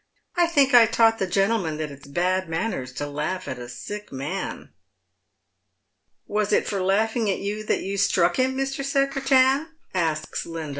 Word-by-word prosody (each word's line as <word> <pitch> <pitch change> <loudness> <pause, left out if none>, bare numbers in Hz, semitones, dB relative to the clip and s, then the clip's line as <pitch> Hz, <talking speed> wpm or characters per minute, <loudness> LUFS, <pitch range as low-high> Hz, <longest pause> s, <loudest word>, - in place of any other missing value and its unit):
I 350 -1 +4
think 280 -5 +3
I 235 -2 +8
taught 225 0 +3
the 190 - 0
gentleman 195 -4 +1
that 155 -2 -4
it's 140 0 -13
bad 180 +4 0
manners 160 - -2
to 145 - -4
laugh 150 +6 -3
at 130 - -5
a 120 0 -8
sick 205 +13 -7
man." 150 +9 -5 0.8
" - - -51
Was 210 0 -1
it - - +3
for 200 -2 -2
laughing 220 +4 +1
at 195 - +1
you 210 +2 -4
that - - 0
you 200 +1 -3
struck 180 -3 +2
him, 260 +1 +1
Mr. 270 0 -2
Secretan? 275 +1 +2
" - - -40
asks 160 -4 -1
Linda. 165 -2 -5
200 Hz, 180 wpm, -24 LUFS, 165-240 Hz, 0.8 s, I